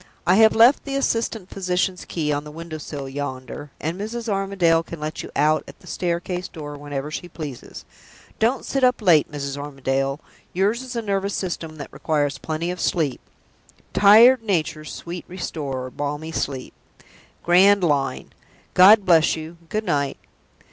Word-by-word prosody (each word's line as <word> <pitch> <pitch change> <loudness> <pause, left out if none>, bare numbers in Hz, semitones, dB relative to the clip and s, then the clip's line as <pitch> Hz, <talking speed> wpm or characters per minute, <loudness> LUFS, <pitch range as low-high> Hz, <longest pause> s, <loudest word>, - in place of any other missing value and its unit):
"I 180 - +4
have 220 0 +6
left 235 +5 +6
the 275 -1 -4
assistant 230 -7 -1
physician's 180 -1 -1
key 150 -3 -1
on 145 0 -2
the 150 - -10
window 160 +1 -7
sill 140 -2 -6
yonder, 135 +1 -6
and 170 +5 -3
Mrs. 230 +2 -5
Armadale 195 -5 +2
can 165 -1 -9
let 155 +1 -4
you - - -8
out 155 +2 +2
at - - -12
the - - -19
staircase 175 0 -3
door 145 -3 -8
whenever 145 0 -5
she 175 +3 -6
pleases. 150 -7 -8 0.5
Don't 235 +4 +1
sit 270 -1 -1
up 250 -1 +4
late, 170 - +4
Mrs. 140 -1 -4
Armadale! 135 -1 -2 0.3
Yours 205 +6 +1
is 255 -1 -8
a 230 - -2
nervous 200 -1 -1
system 170 -4 -4
that 145 -3 -9
requires 145 -2 -1
plenty 160 +5 -3
of 180 - -6
sleep. 155 -7 0 0.7
'Tired 225 +5 +7
nature's 160 -7 -2
sweet 170 0 -7
restorer, 140 -8 -5
balmy 145 +3 -4
sleep.' 135 -5 -3 0.7
Grand 190 +3 +5
line! 145 -5 0 0.4
God 200 +3 +7
bless 165 -3 +4
you 160 +1 -8
good 215 +1 -2
night!" 140 -5 0
165 Hz, 160 wpm, -22 LUFS, 145-195 Hz, 0.7 s, Tired